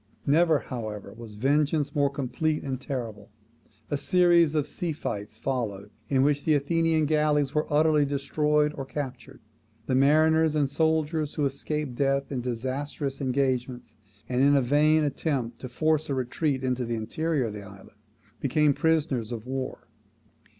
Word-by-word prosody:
Never, 160 +2 +4
however, 110 -7 -6
was 115 -2 -11
vengeance 145 +4 +1
more 140 -1 +2
complete 140 +3 -2
and 135 -2 -4
terrible. 115 -6 -5 0.6
A 145 - +1
series 170 -1 +4
of 150 -2 +1
sea 170 0 -3
fights 105 -6 -5
followed, 105 -6 -3 0.2
in 135 -1 +3
which 145 0 +1
the 155 - +3
Athenian 160 +2 +1
galleys 150 -2 +1
were 150 0 -1
utterly 150 0 +4
destroyed 150 +2 +1
or 135 - -5
captured. 135 -2 -7 0.4
The 130 - -1
mariners 155 +3 +4
and 145 -2 +2
soldiers 160 +1 0
who 150 - +1
escaped 140 0 -3
death 140 0 0
in 130 -3 -2
disastrous 130 +4 -4
engagements, 130 -3 -1 0.3
and 125 0 0
in 140 +1 +5
a 140 - +4
vain: 150 +4 +3
attempt 135 -5 -2
to 130 - -7
force 155 +4 0
a 140 - 0
retreat 130 +2 -1
into 125 -1 0
the 120 0 -2
interior 150 +6 -1
of 110 -3 -3
the 105 - -7
island, 100 -1 -14 0.4
became 150 +2 +2
prisoners 150 -8 0
of 115 -1 -5
war. 130 -1 -5
140 Hz, 155 wpm, -27 LUFS, 125-150 Hz, 0.6 s, in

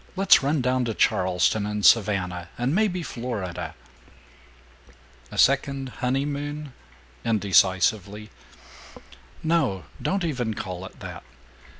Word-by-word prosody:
Let's 195 -3 +6
run 140 +1 +1
down 125 0 +1
to 115 -2 -3
Charleston 95 +3 +2
and 105 -1 -2
Savannah 95 -5 +3
and 125 +4 0
maybe 185 -3 +1
Florida. 95 - -5 1.5
"A - - -9
second 140 -1 +2
honeymoon?" 145 +2 -2 0.5
indecisively. 100 0 +2 1.1
"No. 155 - +1 0.2
Don't 195 -1 -1
even 125 -8 -2
call 95 -1 -6
it - - -13
that. - - -7
115 Hz, 100 wpm, -25 LUFS, 95-140 Hz, 1.5 s, Let's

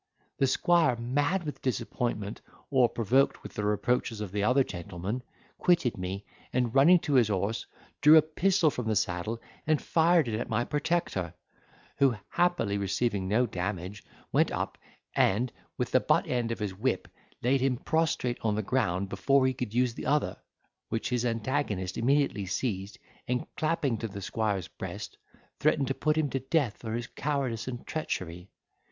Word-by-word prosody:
The 135 - +4
squire, 165 -1 +3
mad 145 +10 0
with 150 -2 -6
disappointment, 115 -4 -2 0.3
or 130 -3 +5
provoked 125 +5 +2
with - - -9
the 105 - -3
reproaches 105 +2 0
of 105 -3 -4
the 100 0 -1
other 125 +5 +4
gentleman, 95 +4 -5 0.4
quitted 170 -9 +3
me, 95 +2 -5 0.3
and 125 -2 0
running 150 +7 +7
to 150 - -2
his 125 -5 +5
horse, 105 +3 -1 0.3
drew 150 +2 +9
a 155 - +7
pistol 170 +1 +2
from 125 -4 -4
the 110 - +1
saddle, 100 +3 -1 0.3
and 155 -2 +3
fired 165 -3 +3
it 110 -1 -1
at - - -4
my 120 - +1
protector, 145 - -1 0.6
who 135 -4 +4
happily 175 -14 +1
receiving 100 0 0
no 110 +6 +3
damage, 95 -1 -4 0.3
went - - +3
up, - - -3 0.4
and, 115 +6 +2 0.3
with - - -2
the - - +5
butt - - +2
end 120 -2 -1
of 115 - -2
his 105 -3 -3
whip 95 - -1 0.4
laid 130 +2 +3
him 130 -2 +2
prostrate 160 -5 0
on 110 -2 +1
the 110 - -1
ground 100 -5 0
before 130 +8 +2
he 130 - +2
could 125 -4 -4
use 125 +1 +2
the - - -6
other, 150 +1 +1 0.5
which 115 - -2
his 125 -2 0
antagonist 115 -5 -1
immediately 130 -5 +1
seized, 95 -1 -2 0.3
and, 125 0 -1
clapping 155 -7 0
to 115 - -2
the 100 -1 -7
squire's 100 -2 -1
breast, - - -7 0.4
threatened 145 -1 +3
to 135 - 0
put 155 +3 0
him 155 -2 +2
to 135 - -2
death 135 -4 0
for 110 -2 -5
his 120 0 -3
cowardice 135 -6 -2
and 120 -2 -5
treachery. 90 - -4
120 Hz, 170 wpm, -29 LUFS, 105-140 Hz, 0.6 s, drew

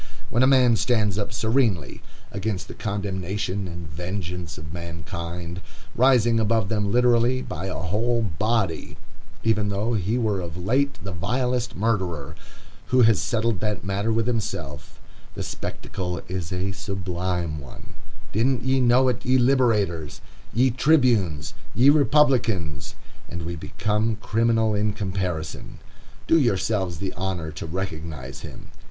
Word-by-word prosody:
When 120 - +2
a 130 - +6
man 125 -4 +5
stands 105 -5 +1
up 100 - -2
serenely 110 - 0 0.3
against 100 -2 -3
the - - -8
condemnation 100 -1 -3
and 85 -1 -7
vengeance 90 0 -5
of 80 0 -9
mankind, 85 0 -6 0.3
rising 120 -3 +4
above 110 -2 +1
them 105 -2 0
literally 125 +1 +3
by 95 - -5
a 95 - -4
whole 115 +8 0
body,—even 105 +2 -2
though 105 +4 -1
he 105 +2 0
were 110 -5 +1
of 85 -1 -6
late 130 +10 +1
the 100 - -4
vilest 125 +7 -1
murderer, 95 -9 -1 0.5
who 125 -1 +5
has 110 -3 +5
settled 115 -3 0
that 105 -1 -2
matter 100 +4 -1
with 115 0 +1
himself,—the 80 - -5
spectacle 90 -2 -4
is 90 -2 -4
a 95 +1 -1
sublime 90 -4 -3
one,—didn't 115 - -4
ye 130 +1 +2
know 125 +1 +5
it, 125 -1 0
ye 130 +1 +3
Liberators, 110 - +2 0.3
ye 130 +2 +3
Tribunes, 120 - +2 0.2
ye 130 +5 +7
Republicans?—and 115 - +1
we 85 +1 -4
become 110 +7 -1
criminal 115 0 +1
in 105 0 +1
comparison. 95 -6 -3 0.5
Do 165 - +5
yourselves 100 - +1
the 95 +2 -4
honor 90 -4 -3
to 75 +2 -6
recognize 80 -7 -5
him. - - -10
100 Hz, 130 wpm, -24 LUFS, 90-115 Hz, 0.5 s, ye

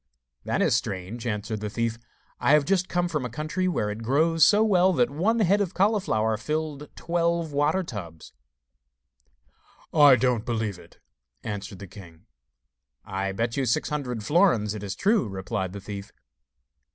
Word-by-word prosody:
'That - - 0
is - - +3
strange,' 100 +6 -4
answered 110 0 -3
the 105 0 -4
thief. 115 +1 -2 0.4
'I 140 - +3
have 150 -2 +4
just 185 +2 +1
come 175 0 0
from 150 -5 -2
a 125 - -3
country 155 +9 -2
where 105 -12 -1
it 105 +2 -6
grows 155 +7 +2
so 210 0 +6
well 190 -3 +4
that 125 -4 +2
one 195 +11 +1
head 200 +1 +3
of 185 -2 -2
cauliflower 185 - +1
filled 150 +3 -4
twelve 170 -1 -1
water 150 +6 +1
tubs.' 85 - -9 1.6
'I 145 -4 +8
don't 125 -2 +1
believe 110 -6 -2
it,' - - -17 0.5
answered 100 -2 -5
the 100 - -9
king. 85 -4 -14 0.8
'I 95 0 -3
bet 115 +5 -2
you 135 - +1
six 120 - 0
hundred 125 -7 -3
florins 135 - +3
it 105 - -6
is 100 -1 -5
true,' 205 - +2
replied 95 0 -3
the 100 - -7
thief. 100 0 -8
125 Hz, 165 wpm, -26 LUFS, 105-170 Hz, 1.6 s, I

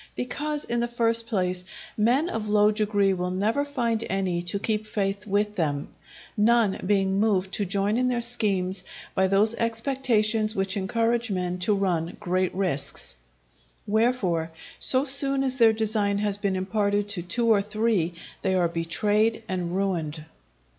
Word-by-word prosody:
Because, 295 +4 -2
in 240 - -1
the 235 - 0
first 230 -1 +1
place, 185 -5 -1 0.3
men 245 +9 +2
of 220 -8 -4
low 210 0 +4
degree 205 -2 +1
will 180 -1 -2
never 210 +9 0
find 235 -6 -1
any 190 -3 -1
to 175 +3 -1
keep 215 +1 -2
faith 200 -1 -2
with 210 +1 0
them, 145 -4 -1 0.5
none 220 -1 +3
being 195 0 +1
moved 195 -3 +1
to 205 - 0
join 200 +3 0
in 250 0 +1
their 245 -1 0
schemes 195 -6 +1 0.3
by 190 0 +2
those 200 +4 +3
expectations 225 -2 +1
which 195 +1 0
encourage 230 +4 0
men 180 -2 -2
to 205 +3 +2
run 175 -4 -1
great 185 +1 0
risks; 180 - -3 0.7
wherefore, 205 -7 +1 0.3
so 260 +1 +2
soon 275 -1 +2
as 260 -1 0
their 230 -3 +6
design 215 -2 0
has 205 -1 0
been 200 -1 -1
imparted 205 +1 0
to 200 -4 -2
two 205 +7 -1
or 210 -3 +5
three, 210 -4 0 0.3
they 190 -1 0
are 180 -2 +3
betrayed 205 +8 0
and 180 -2 -3
ruined. 165 -6 -2
205 Hz, 155 wpm, -25 LUFS, 185-230 Hz, 0.7 s, their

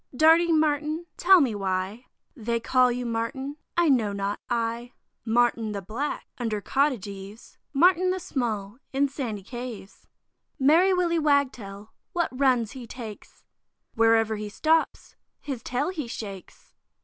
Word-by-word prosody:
Darting 325 +2 +5
Martin! 305 +2 0
tell 375 0 +6
me 255 -6 +1
why 195 +4 -3 0.3
They 235 0 -2
call 250 +2 +3
you 245 0 -3
Martin, 240 +5 -3 0.2
I 345 -1 +4
know 230 -7 +3
not, 200 +1 -2
I; 235 +1 -2 0.3
Martin 230 -1 +2
the 200 - -4
black, 235 +10 -4
under 225 -3 -1
cottage 270 0 0
eaves, 200 +2 -10
Martin 360 +5 +4
the 375 0 0
small, 235 - -3
in 280 +1 +2
sandy 235 -8 -4
caves. 240 -3 -8 0.5
Merry 325 +8 +5
Willy 350 -2 +2
Wagtail, 250 -9 0 0.2
what 345 -2 0
runs 255 -4 +2
he 255 -4 -9
takes! 225 -3 -10 0.5
Wherever 225 -1 +3
he 210 0 -5
stops, 320 +9 0 0.2
his 270 -5 -5
tail 255 +7 -1
he 310 -9 -4
shakes. 200 -5 -9
245 Hz, 135 wpm, -26 LUFS, 220-295 Hz, 0.5 s, tell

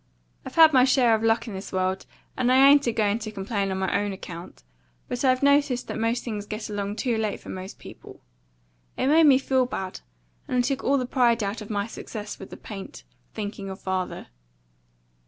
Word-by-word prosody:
I've - - -9
had 320 -2 +8
my 255 -2 +6
share 255 -3 +4
of 220 - +1
luck 225 +1 +1
in 220 - -6
this 190 +1 -7
world, 185 0 -1 0.3
and 250 0 +1
I 265 +2 +7
ain't 285 -1 +6
a - - +3
going 215 -1 +1
to 215 -1 -6
complain 200 0 -2
on 190 - -2
my 190 0 -1
OWN 205 0 0
account, 175 - -10 0.4
but 245 - -4
I've 255 0 +3
noticed 280 -3 +3
that - - -4
most 230 +2 0
things 210 -4 -5
get 215 0 -5
along 205 0 -3
too 235 -1 -1
late 215 -2 -2
for - - -12
most 185 +1 -7
people. - - -13 0.8
It - - 0
made 310 +3 +5
me 270 -2 +7
feel 260 -1 +1
bad, 190 -7 -5 0.5
and - - -1
it 245 - +3
took 270 +1 -2
all 280 +1 +3
the 255 - -1
pride 240 -3 +2
out 205 +1 -4
my 205 -2 -1
success 215 -2 -7
with 195 - -9
the - - -10
paint, 195 -3 -9 0.3
thinking 205 -2 -5
of 190 - -7
father. 185 -1 -4
220 Hz, 210 wpm, -25 LUFS, 200-255 Hz, 0.8 s, had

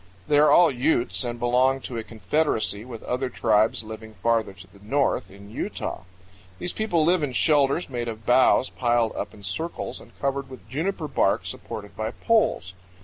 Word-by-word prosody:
They 145 -1 +4
are 150 - +6
all 175 -3 +6
Utes 130 0 +1
and 120 -1 -3
belong 125 +3 +2
to 125 - -6
a 115 - -3
confederacy 110 -1 -1
with 120 -3 -9
other 125 +1 -2
tribes 110 -2 +2
living 110 0 -9
farther 115 +1 +1
to 95 -1 -13
the 100 +2 -20
north, 135 +2 0
in 100 +1 -14
Utah. 95 - -4 0.5
These 175 - -2
people 175 -8 +1
live 175 +1 +3
in 145 -4 -2
shelters 145 +4 +2
made 120 -3 -4
of 110 -1 -6
boughs 130 +1 +4
piled 120 -2 +1
up - - -4
in 100 - -15
circles 160 - -4
and - - -18
covered 140 -1 -2
with 130 -4 -12
juniper 160 - -2
bark 135 - +1
supported 105 -1 -7
by 110 0 -2
poles. 165 - +1
125 Hz, 180 wpm, -25 LUFS, 110-145 Hz, 0.5 s, are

